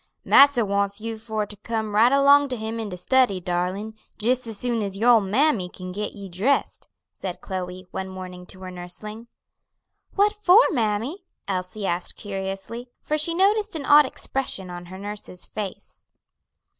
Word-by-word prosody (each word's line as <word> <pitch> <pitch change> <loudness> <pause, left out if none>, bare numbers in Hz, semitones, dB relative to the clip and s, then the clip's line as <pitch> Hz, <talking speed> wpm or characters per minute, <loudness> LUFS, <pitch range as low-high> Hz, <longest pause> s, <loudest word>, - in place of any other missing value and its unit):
"Massa 275 -5 +6
wants 200 0 0
you 225 +1 -4
for 220 -1 -2
to 210 - -7
come 220 0 -3
right 225 +4 +5
along 280 +1 +5
to 255 - -2
him 220 +1 -4
in 220 -2 -4
de 180 - -6
study, 240 +1 +2
darlin', 180 +5 -2 0.2
jis 245 +3 0
as 220 -2 -5
soon 235 0 0
as 195 -1 -3
your 235 +4 +5
ole 230 -2 +6
mammy 210 -1 +2
kin 185 0 -8
get 210 +3 -4
you 200 -1 -8
dressed," 200 +11 0 0.3
said 185 -2 -6
Chloe, 185 0 -5
one 190 0 -4
morning 185 -1 -8
to 185 - -10
her 185 -1 -7
nursling. 210 +6 -8 0.9
"What 410 +1 +4
for, 420 +1 +6
mammy?" 240 - -1 0.2
Elsie 190 +2 -3
asked 175 -1 -2
curiously, 195 +4 -5
for 305 - -1
she 335 +3 +2
noticed 410 +2 +2
an 295 -3 -4
odd 295 -1 +7
expression 250 -10 -3
on 175 0 -8
her 185 +1 -9
nurse's 205 -2 -8
face. 205 -3 -8
210 Hz, 170 wpm, -24 LUFS, 190-255 Hz, 0.9 s, odd